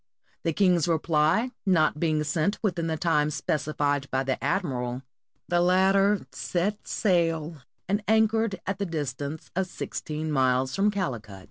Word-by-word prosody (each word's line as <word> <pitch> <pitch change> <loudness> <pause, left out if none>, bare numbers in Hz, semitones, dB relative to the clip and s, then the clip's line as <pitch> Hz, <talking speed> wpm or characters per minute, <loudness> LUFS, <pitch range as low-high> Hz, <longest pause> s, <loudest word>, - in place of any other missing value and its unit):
The 165 - 0
king's 180 -2 +3
reply 165 +8 +2
not 165 -6 +2
being 155 -2 +1
sent 155 +6 0
within 175 -5 0
the 160 -1 -1
time 150 -2 +2
specified 145 -2 -1
by 130 0 0
the 130 -2 -2
admiral, 130 -6 -1 0.4
the 175 0 +2
latter 195 +3 +3
set 200 +4 -2
sail 165 -5 0 0.3
and 205 +2 0
anchored 220 -1 +2
at 195 0 -3
the 200 - -1
distance 145 -1 -4
of 190 0 0
sixteen 155 -3 -5
miles 130 -1 +2
from 200 +2 +3
Calicut. 120 - -4
165 Hz, 140 wpm, -26 LUFS, 145-190 Hz, 0.4 s, king's